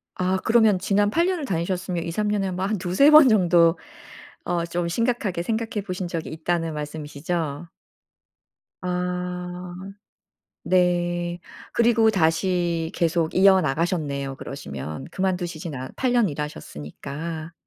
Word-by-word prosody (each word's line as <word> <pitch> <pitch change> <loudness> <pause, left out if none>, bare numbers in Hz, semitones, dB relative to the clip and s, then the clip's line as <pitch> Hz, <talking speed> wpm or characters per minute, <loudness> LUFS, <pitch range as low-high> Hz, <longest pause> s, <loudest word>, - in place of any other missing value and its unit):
아 185 +1 0
그러면 220 -4 +4
지난 205 +2 +2
8 335 +6 +2
년을 360 -6 -1
다니셨으면 180 -2 -2
2-3 210 +5 -1
년에 200 -2 0
뭐 185 +1 -3
한 215 +1 0
2-3 185 - +4
번 305 -3 +9
정도 175 -5 +4 0.7
어 170 -1 -1
좀 170 0 -2
심각하게 230 -4 -1
생각해 225 0 -2
보신 185 -1 -3
적이 165 -2 -4
있다는 165 0 -2
말씀이시죠? 150 +1 -4 1.1
아 180 0 -4 0.9
네. 175 -1 +1 0.4
그리고 230 -1 +4
다시 170 -2 +1
계속 165 -1 0
이어 190 0 +6
나가셨네요 145 -3 -1
그러시면. 75 - -7
그만두시진 175 -4 -2
않 130 0 -5
8 255 -2 +1
년 235 -5 +3
일하셨으니까. 150 - -6
175 Hz, 250 characters per minute, -24 LUFS, 165-195 Hz, 1.1 s, 번